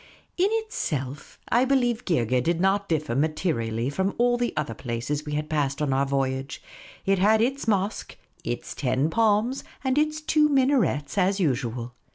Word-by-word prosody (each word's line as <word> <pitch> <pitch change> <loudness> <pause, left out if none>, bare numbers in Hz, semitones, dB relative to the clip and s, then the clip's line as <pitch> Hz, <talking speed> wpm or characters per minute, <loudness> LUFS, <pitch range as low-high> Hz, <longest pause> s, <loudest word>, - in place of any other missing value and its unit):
In 370 +2 +3
itself, 150 - -3
I 240 +2 +4
believe, 250 -3 +1
Geergeh 125 - +1
did 170 +5 0
not 195 +2 +1
differ 150 -7 -1
materi 155 -4 0
ally 115 +3 -1
from 190 +7 -1
all 245 0 +3
the 240 0 -1
other 145 -7 -1
places 125 +6 -4
we 150 - -3
had 150 +1 -2
passed 140 -3 -1
on 145 -3 0
our 135 +1 +1
voyage; 135 0 -2 0.5
it 195 -1 +2
had 215 +3 +4
its 265 +3 0
mosque, 200 -1 -1 0.3
its - - -4
ten 135 +3 0
palms, 225 +5 +2 0.2
and 265 +1 +2
its 305 0 0
two 305 -1 +3
minarets, 255 - +2
as 195 +2 +2
usual. 125 - -1
165 Hz, 170 wpm, -25 LUFS, -, 0.5 s, I